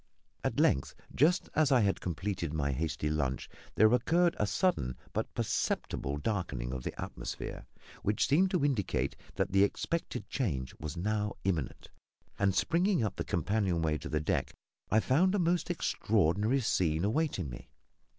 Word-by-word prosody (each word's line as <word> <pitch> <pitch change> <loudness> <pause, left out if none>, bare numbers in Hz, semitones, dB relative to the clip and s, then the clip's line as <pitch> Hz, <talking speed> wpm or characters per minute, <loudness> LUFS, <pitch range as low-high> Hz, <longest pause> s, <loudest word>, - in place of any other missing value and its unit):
At - - -1
length, 65 - +2 0.2
just 170 +7 +3
as 155 -3 +3
I 130 -3 +5
had 100 -2 +1
completed 85 -2 -3
my 70 -2 0
hasty 75 +2 -2
lunch, 75 -4 -1 0.3
there 110 +2 +5
occurred 170 +8 +3
a 105 - +2
sudden 100 - 0 0.2
but - - -2
perceptible 70 +2 -1
darkening 75 - -2
of 65 - -4
the - - -6
atmosphere - - -6 0.3
which 105 +1 +1
seemed 175 +8 +4
to 180 -6 +1
indicate 125 -10 0 0.2
that - - 0
the 100 +1 +5
expected 165 +10 -2
change 70 - -2
was 75 +1 -5
now 105 +3 -1
imminent, 85 -9 -2 0.5
and, 100 -2 +2
springing 175 - +2
up 105 - -1
the - - -2
companion 90 0 0
way 75 -1 +1
to - - -7
the 75 - 0
deck, 75 - -1 0.3
I 110 - +4
found 180 - +3
a - - +2
most 175 -2 +1
extraordinary 110 - +1
scene 85 -6 +1
awaiting 110 - 0
me. - - -10
100 Hz, 160 wpm, -31 LUFS, -, 0.5 s, I